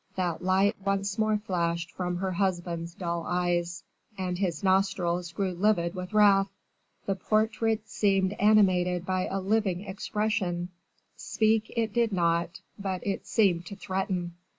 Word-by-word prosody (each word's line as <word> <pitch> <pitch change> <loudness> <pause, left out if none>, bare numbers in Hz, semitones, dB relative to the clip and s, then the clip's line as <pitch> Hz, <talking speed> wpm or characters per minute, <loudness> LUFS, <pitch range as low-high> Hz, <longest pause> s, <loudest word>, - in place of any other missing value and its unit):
that 180 -2 -2
light 190 +2 +3
once 195 +1 -1
more 215 -1 +2
flashed 170 -4 -2
from 180 -1 -3
her 190 +1 -2
husband's 175 -2 -2
dull 170 -2 -3
eyes, 175 -1 -1 0.3
and 180 -1 -3
his 175 -5 -1
nostrils 185 -3 +1
grew 190 +2 -1
livid 175 -2 +1
with 180 0 -6
wrath. 200 -2 +5 0.6
The 195 - +1
portrait 220 +2 0
seemed 195 -1 +1
animated 185 -4 +3
by 185 0 0
a 195 - -2
living 195 -2 0
expression 190 -3 -2 0.5
speak 220 0 +1
it 225 -3 0
did 235 -1 +2
not, 170 -2 0 0.2
but 190 -2 -3
it 200 -1 -3
seemed 180 -6 +2
to 200 - -7
threaten. 190 -3 -3
190 Hz, 140 wpm, -28 LUFS, 175-205 Hz, 0.6 s, wrath